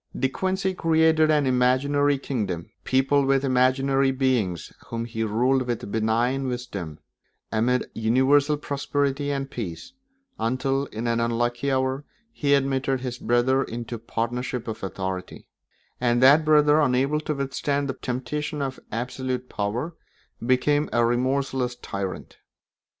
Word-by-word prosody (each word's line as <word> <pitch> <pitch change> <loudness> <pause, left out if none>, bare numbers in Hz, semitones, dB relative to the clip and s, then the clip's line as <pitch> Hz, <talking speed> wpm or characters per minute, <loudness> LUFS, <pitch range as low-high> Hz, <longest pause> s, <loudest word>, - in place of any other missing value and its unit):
De 135 - +2
Quincey 190 +6 -1
created 160 -2 +3
an 150 -2 +3
imaginary 135 +3 +2
kingdom, 100 -11 -3
peopled 135 +1 +2
with 135 0 +2
imaginary 135 +1 +3
beings 130 - 0
whom 115 0 -3
he 115 -1 -3
ruled 125 +4 +1
with 120 -4 -3
benignant 115 +5 +1
wisdom, 100 -11 -5 0.5
amid 120 +3 +1
universal 135 +6 +3
prosperity 145 0 -1
and 135 -1 -3
peace, 105 - -6 0.5
until, 135 +4 0
in 110 +2 -5
an 115 0 +1
unlucky 120 +3 0
hour, 130 +1 0 0.3
he 145 -10 +2
admitted 135 -1 0
his 125 -1 -5
brother 120 +3 +2
into 120 +1 -6
a 115 - -4
partnership 120 +2 -3
of 110 - -5
authority; 95 -1 -5 0.5
and 120 -1 +2
that 140 +5 +7
brother, 150 0 +5
unable 135 +2 +2
to 150 0 -3
withstand 140 +1 -1
the 135 - -2
temptation 145 +4 -4
of 135 -2 -3
absolute 125 +1 -3
power, 120 +10 -2 0.5
became 145 +5 +2
a 120 0 +3
remorseless 130 +1 0
tyrant. 100 -5 -6
130 Hz, 130 wpm, -25 LUFS, 120-140 Hz, 0.5 s, that